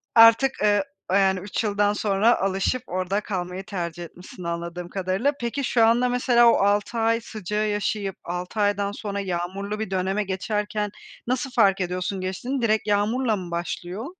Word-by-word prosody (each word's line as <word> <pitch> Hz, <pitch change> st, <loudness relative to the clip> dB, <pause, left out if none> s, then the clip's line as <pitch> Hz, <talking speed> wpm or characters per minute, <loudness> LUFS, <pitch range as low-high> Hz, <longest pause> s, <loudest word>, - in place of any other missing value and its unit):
artık, 230 Hz, +4 st, +7 dB
eee, 205 Hz, +2 st, +3 dB, 0.3 s
yani 190 Hz, -1 st, +3 dB
3 200 Hz, +4 st, -3 dB
yıldan 205 Hz, -1 st, +2 dB
sonra 210 Hz, +3 st, +2 dB
alışıp 195 Hz, +6 st, 0 dB
orada 185 Hz, +3 st, -1 dB
kalmayı 185 Hz, -2 st, -4 dB
tercih 175 Hz, -3 st, -4 dB
etmişsin 180 Hz, +1 st, -11 dB
anladığım 170 Hz, +1 st, -4 dB
kadarıyla. 195 Hz, +9 st, 0 dB
Peki, 240 Hz, +4 st, -2 dB
şu 235 Hz, -2 st, +3 dB
anda 240 Hz, +2 st, +3 dB
mesela 240 Hz, -1 st, +5 dB
o -, -, +3 dB
6 205 Hz, +3 st, +1 dB
ay 230 Hz, +1 st, +2 dB
sıcağı 215 Hz, -1 st, -3 dB
yaşayıp 205 Hz, -1 st, -2 dB
6 180 Hz, +4 st, -5 dB
aydan 205 Hz, -1 st, +1 dB
sonra 205 Hz, -1 st, -4 dB
yağmurlu 195 Hz, +3 st, -3 dB
bir 220 Hz, -3 st, -4 dB
döneme 190 Hz, +2 st, 0 dB
geçerken 210 Hz, +2 st, -2 dB, 0.4 s
nasıl 255 Hz, +2 st, -1 dB
fark 195 Hz, -5 st, +3 dB
ediyorsun 180 Hz, +2 st, -2 dB
geçtiğini? 240 Hz, +9 st, -3 dB
Direkt 215 Hz, -2 st, +1 dB
yağmurla 215 Hz, +3 st, +1 dB
mı 180 Hz, -3 st, -7 dB
başlıyor? 175 Hz, +5 st, -4 dB
205 Hz, 155 wpm, -24 LUFS, 185-225 Hz, 0.4 s, artık